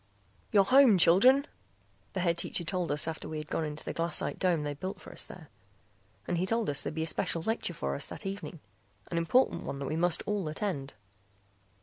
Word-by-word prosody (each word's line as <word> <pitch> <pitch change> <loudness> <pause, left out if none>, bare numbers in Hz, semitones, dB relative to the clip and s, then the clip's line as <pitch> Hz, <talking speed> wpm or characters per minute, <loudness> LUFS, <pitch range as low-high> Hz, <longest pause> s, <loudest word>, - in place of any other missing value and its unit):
"You're 200 -2 +6
home, 255 -1 +6
children," 250 - +6 0.7
the 185 - -1
Head 170 -1 +2
Teacher 175 - -2
told 170 0 -2
us 150 +2 +1
after 160 -1 -5
we 155 - -4
had 150 0 -7
gone - - 0
into 150 -1 -5
the - - -3
glassite 165 -1 0
dome 175 -5 +1
they'd 145 -1 -4
built 185 +1 -5
for - - -11
us - - -2
there. 160 -5 -12 0.8
And 175 - 0
he 185 - 0
told 225 -6 +1
us 140 - +2
there'd - - -4
be 160 - -1
a - - -1
special 165 +1 0
lecture 220 -5 -1
for 70 - -2
us 70 - -3
that - - -8
evening, 195 -4 -6 0.5
an 170 - +1
important 245 +11 +2
one 140 - -5
that 140 - -4
we 155 - -2
must 170 0 +2
all 205 -5 -1
attend. 155 - -3
170 Hz, 215 wpm, -30 LUFS, 155-195 Hz, 0.8 s, You're